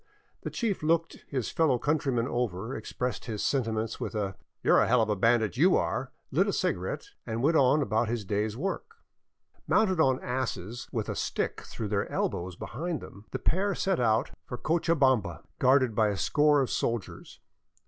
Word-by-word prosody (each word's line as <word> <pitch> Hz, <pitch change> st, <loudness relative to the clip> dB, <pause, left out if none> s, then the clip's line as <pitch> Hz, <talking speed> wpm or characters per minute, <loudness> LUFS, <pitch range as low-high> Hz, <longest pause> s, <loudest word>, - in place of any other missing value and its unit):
The -, -, -4 dB
chief 220 Hz, -5 st, -2 dB
looked 165 Hz, +1 st, 0 dB
his 130 Hz, -5 st, -2 dB
fellow 155 Hz, -6 st, +3 dB
countryman 135 Hz, -4 st, 0 dB
over, 120 Hz, -2 st, -2 dB
expressed 125 Hz, +3 st, -4 dB
his 110 Hz, -4 st, -3 dB
senti 130 Hz, -5 st, +1 dB
ments 110 Hz, 0 st, -3 dB
with -, -, -4 dB
a 100 Hz, -3 st, -2 dB
" -, -, -55 dB
You -, -, +4 dB
're -, -, +7 dB
a -, -, +2 dB
hell 120 Hz, -1 st, +4 dB
of 110 Hz, -, -3 dB
a 105 Hz, -, +2 dB
bandit, 115 Hz, +2 st, +2 dB
you 175 Hz, +7 st, +5 dB
are," -, -, -2 dB, 0.2 s
lit -, -, +3 dB
a -, -, 0 dB
cigarette, -, -, -1 dB, 0.2 s
and 115 Hz, +1 st, -3 dB
went 160 Hz, +4 st, +3 dB
on 140 Hz, +1 st, +4 dB
about 110 Hz, 0 st, +1 dB
his 115 Hz, -3 st, -2 dB
day's 105 Hz, +3 st, -1 dB
work. 195 Hz, -, -4 dB, 0.7 s
Mounted 190 Hz, -5 st, +3 dB
on 130 Hz, -4 st, +4 dB
asses, 120 Hz, -3 st, -3 dB
with -, -, -2 dB
a -, -, -3 dB
stick -, -, -2 dB
through 110 Hz, -3 st, -6 dB
their 100 Hz, -1 st, -1 dB
elbows 90 Hz, 0 st, -2 dB
behind 160 Hz, -, -4 dB
them, 100 Hz, +2 st, -12 dB
the -, -, -3 dB
pair 195 Hz, +3 st, +1 dB
set 190 Hz, -2 st, 0 dB
out 110 Hz, -2 st, +2 dB, 0.2 s
for 125 Hz, -, -5 dB
Cochabamba 130 Hz, -, +1 dB, 0.2 s
guarded 130 Hz, -2 st, +4 dB
by 110 Hz, 0 st, +3 dB
a 100 Hz, -2 st, -1 dB
score 150 Hz, +6 st, +3 dB
of 130 Hz, -, -1 dB
soldiers. 115 Hz, -4 st, -3 dB
125 Hz, 190 wpm, -29 LUFS, 110-150 Hz, 0.7 s, re